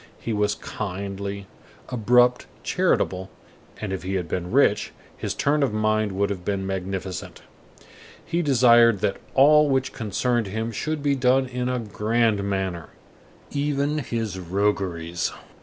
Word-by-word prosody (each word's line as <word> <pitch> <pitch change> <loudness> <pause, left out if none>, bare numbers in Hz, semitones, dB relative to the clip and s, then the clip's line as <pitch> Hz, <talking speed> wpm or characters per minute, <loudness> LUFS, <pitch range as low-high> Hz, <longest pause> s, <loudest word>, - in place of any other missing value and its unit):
He 115 - -3
was 105 0 +1
kindly, 100 0 -5 0.4
abrupt, 125 +1 +3 0.2
charitable, 95 +1 0 0.5
and 105 -3 -3
if 95 - -3
he 95 +3 -3
had 90 -3 -2
been 90 +2 -3
rich, 110 -4 +2 0.2
his - - -4
turn 145 +1 +1
of 135 -6 +1
mind 110 -1 +1
would 100 +1 0
have 90 -3 -5
been 95 0 -2
magnificent. 95 -1 -5 0.8
He 170 - 0
desired 120 - +5
that 105 -2 0 0.2
all 150 +2 +6
which 135 -1 0
concerned 120 0 -1
him 110 +4 -3
should 155 +6 -3
be 145 -1 +2
done 130 0 +3
in 125 0 -3
a 125 - 0
grand 110 -1 0
manner, 95 -4 -2 0.6
even 145 +1 0
his 115 -7 -3
rogueries. 90 -2 -1
110 Hz, 140 wpm, -24 LUFS, 95-125 Hz, 0.8 s, all